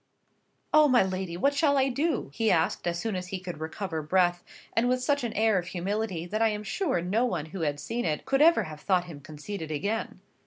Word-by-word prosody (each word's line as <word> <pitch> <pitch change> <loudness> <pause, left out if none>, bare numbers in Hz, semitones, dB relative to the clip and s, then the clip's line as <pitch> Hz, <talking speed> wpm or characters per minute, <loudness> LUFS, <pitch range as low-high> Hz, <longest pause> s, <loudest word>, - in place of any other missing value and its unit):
"Oh, 305 -1 +7
my 255 -6 +5
lady, 185 -2 -3
what 280 +9 +2
shall 285 -1 +3
I 265 0 +3
do?" 290 - -1
he 225 +5 +1
asked, 165 -1 +1
as 170 0 0
soon 215 +3 -2
as 180 0 -4
he 190 - -4
could 180 -3 -7
recover 160 +1 -4
breath, 175 +2 +2 0.3
and 240 +2 +2
with 255 0 +1
such 285 -1 +1
an 235 - -2
air 215 -2 +3
of 175 - -7
humility, 190 0 -2
that 215 +5 -3
I 225 - +5
am 210 0 -3
sure 260 - -1
no 205 +7 +1
one 235 -11 -1
who 190 - -4
had 145 -2 -1
seen 230 +10 -3
it 155 -3 -2
could 270 +1 +2
have 335 +2 +7
ever 155 - -2
thought 180 +3 +1
him 160 -5 -10
conceited 155 +4 -7
again. 200 +8 -3
190 Hz, 230 wpm, -28 LUFS, 170-240 Hz, 0.3 s, Oh